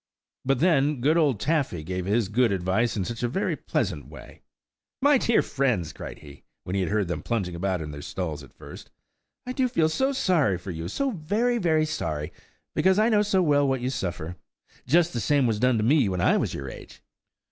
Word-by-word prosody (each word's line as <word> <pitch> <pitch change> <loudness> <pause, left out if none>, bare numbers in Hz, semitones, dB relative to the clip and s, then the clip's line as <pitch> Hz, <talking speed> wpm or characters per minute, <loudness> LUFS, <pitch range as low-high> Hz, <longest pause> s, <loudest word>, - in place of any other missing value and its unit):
But 135 0 +1
then, 150 -5 +3
good 145 +6 +2
old 145 -10 +2
Taffy 140 - 0
gave 90 +2 -4
his 105 +1 +1
good 115 +2 +2
advice 100 +5 0
in 95 - -1
such 115 +2 -5
a 120 - +1
very 190 +12 -1
pleasant - - -2
way! - - -13 0.6
"My 285 0 +4
dear 235 - +3
friends," 115 - -1
cried - - -8
he, 70 -1 -13 0.2
when 90 - -4
he 100 - +1
heard 105 -1 0
them 85 -2 -3
plunging 100 -7 -2
about 90 -1 -2
in 75 - -7
their 75 0 -8
stalls 80 -3 -4
at 70 - -14
first, - - -11 0.6
"I 250 - -4
do 255 -1 +1
feel 165 -11 +1
so 265 +12 +1
sorry 175 - +2
for 90 +2 -7
you–so 85 - -2
very, 215 +7 0
very 160 -5 +2
sorry–because 85 - -2
I 215 +2 +4
know 210 -2 +4
so 200 -3 +2
well 145 -3 +3
what 135 -2 0
you 125 +1 -1
suffer. 90 - -4 0.5
Just 170 +4 +3
the 120 - -2
same 140 +4 +2
was 110 -3 0
done 125 0 +3
with 105 - 0
me 135 -4 +4
when 90 -1 -2
I - - +3
was - - -1
your 70 - -6
age." - - -11
125 Hz, 205 wpm, -26 LUFS, -, 0.6 s, My